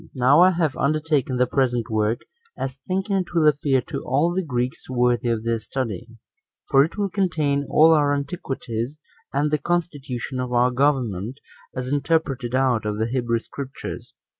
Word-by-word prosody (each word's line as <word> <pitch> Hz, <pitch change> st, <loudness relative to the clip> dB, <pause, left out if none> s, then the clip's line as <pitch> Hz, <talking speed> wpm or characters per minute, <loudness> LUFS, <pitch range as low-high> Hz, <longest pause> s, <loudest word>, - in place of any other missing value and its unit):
2. 165 Hz, -, -18 dB
Now 130 Hz, +5 st, +5 dB
I 185 Hz, -, +8 dB
have 165 Hz, -5 st, 0 dB
undertaken 150 Hz, -3 st, +1 dB
the 125 Hz, -, +4 dB
present 125 Hz, -3 st, 0 dB
work, 110 Hz, +1 st, +1 dB, 0.4 s
as 130 Hz, 0 st, -4 dB
thinking 190 Hz, +2 st, 0 dB
it 180 Hz, -2 st, -3 dB
will 160 Hz, -2 st, +4 dB
appear 140 Hz, -3 st, +2 dB
to 125 Hz, -, -6 dB
all 150 Hz, +7 st, +1 dB
the 190 Hz, -, 0 dB
Greeks 125 Hz, -6 st, -3 dB
2 130 Hz, -, -6 dB
worthy 120 Hz, -1 st, +2 dB
of 115 Hz, -2 st, -1 dB
their 115 Hz, 0 st, 0 dB
study; 115 Hz, -1 st, -4 dB, 0.6 s
for 135 Hz, -1 st, +7 dB
it 165 Hz, +8 st, -4 dB
will 205 Hz, -1 st, +1 dB
contain 155 Hz, -8 st, 0 dB
all 160 Hz, +1 st, +6 dB
our 145 Hz, -2 st, +3 dB
antiquities, 140 Hz, -3 st, -3 dB, 0.3 s
and 145 Hz, +2 st, 0 dB
the 150 Hz, -, +2 dB
constitution 140 Hz, -8 st, -2 dB
of 125 Hz, -1 st, -3 dB
our 125 Hz, +1 st, +3 dB
government, 125 Hz, -4 st, 0 dB, 0.4 s
as 130 Hz, +1 st, -3 dB
interpreted 140 Hz, -5 st, 0 dB
out 130 Hz, -4 st, +2 dB
of 105 Hz, -1 st, -2 dB
the 110 Hz, -, 0 dB
Hebrew 120 Hz, -1 st, 0 dB
Scriptures. 135 Hz, +3 st, -7 dB
135 Hz, 175 wpm, -23 LUFS, 120-155 Hz, 0.6 s, I